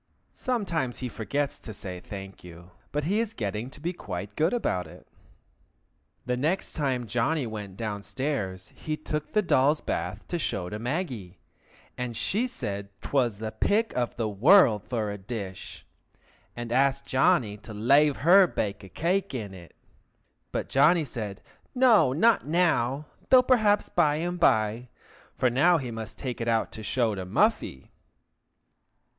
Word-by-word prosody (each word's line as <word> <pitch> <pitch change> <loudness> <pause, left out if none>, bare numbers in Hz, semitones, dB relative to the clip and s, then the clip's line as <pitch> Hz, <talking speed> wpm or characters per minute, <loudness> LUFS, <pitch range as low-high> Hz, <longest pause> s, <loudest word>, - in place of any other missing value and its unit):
(Sometimes 175 - -2
he 130 - -4
forgets 140 +6 -3
to 110 - -9
say 90 -2 -7
"thank 95 0 -9
you," 85 +1 -13 0.2
but 150 +1 -1
he 195 +8 +1
is 225 -1 -2
getting 105 +2 -3
to 135 - -10
be 170 +4 -3
quite 100 - -6
good 160 +3 +2
about 95 - -1
it.) - - -15 1.2
The 125 - 0
next 155 +9 -1
time 130 -5 -1
Johnny 120 +7 0
went 105 -4 -7
down 105 -3 -3
stairs, 100 -8 -4
he 155 -1 -4
took 150 0 -4
the 210 - +3
doll's 150 -2 +3
bath - - -4
to 175 - -2
show 95 - -2
to 105 - -5
Maggie, 120 - -4 0.6
and 120 -2 -3
she 215 - 0
said 100 - -5
'twas 120 -7 0
the 110 +1 -4
pick 220 - +1
of 120 -1 -1
the 115 -2 -1
world 110 - +5
for 110 -5 -2
a 100 - -6
dish, 95 -2 -7 0.7
and 120 -1 -6
asked 135 +2 +2
Johnny 125 -5 +2
to 110 +2 -12
lave 135 +7 +3
her 185 +2 +8
bake 100 -10 -3
a 95 - -11
cake 180 - -1
in 105 -5 -5
it; 85 -3 -13 0.8
but - - -2
Johnny 155 +4 +4
said 105 -7 -6 0.3
no, 245 - +5
not 205 - +3
now, 150 -5 +1 0.2
though 255 -1 +7
perhaps 215 -5 +3
by 155 -4 +2
and 175 +3 -3
by, 110 -3 +2 0.5
for 125 - +2
now 170 +8 +4
he 130 -6 -4
must 110 -1 -7
take 125 -3 -5
it 115 - -2
out 115 -1 +1
to 110 - -9
show 115 +1 0
to 95 -2 -4
Muffy. 80 -7 0
125 Hz, 160 wpm, -27 LUFS, 105-160 Hz, 1.2 s, her